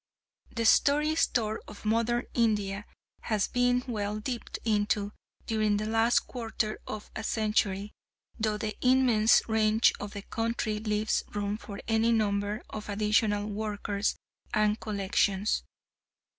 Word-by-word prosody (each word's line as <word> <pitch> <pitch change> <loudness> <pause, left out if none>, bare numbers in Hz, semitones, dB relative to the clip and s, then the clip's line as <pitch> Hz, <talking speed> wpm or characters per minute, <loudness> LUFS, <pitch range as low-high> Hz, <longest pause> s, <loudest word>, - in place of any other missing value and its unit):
The 230 -1 0
story 295 +6 +4
store 225 -8 +1
of 210 - -12
modern 230 +2 +1
India 210 -3 0 0.3
has 215 -3 0
been 245 0 +2
well 210 -3 -2
dipped 240 +2 -4
into 205 -1 +1 0.3
during 215 -2 +1
the 210 - -2
last 225 +2 +3
quarter 225 -3 -3
of 210 - -7
a 225 - -4
century, 210 -2 0 0.5
though 215 -1 0
the 215 -1 -3
immense 250 -4 +4
range 220 0 +3
of 205 0 -6
the 200 -1 -6
country 225 -1 -2
leaves 210 0 0
room 205 0 -1
for 205 -2 -8
any 225 +1 +3
number 205 -1 0
of 215 0 -6
additional 210 0 +1
workers 205 -1 -2 0.4
and 215 0 +2
collections. 200 0 0
215 Hz, 130 wpm, -29 LUFS, 205-225 Hz, 0.5 s, story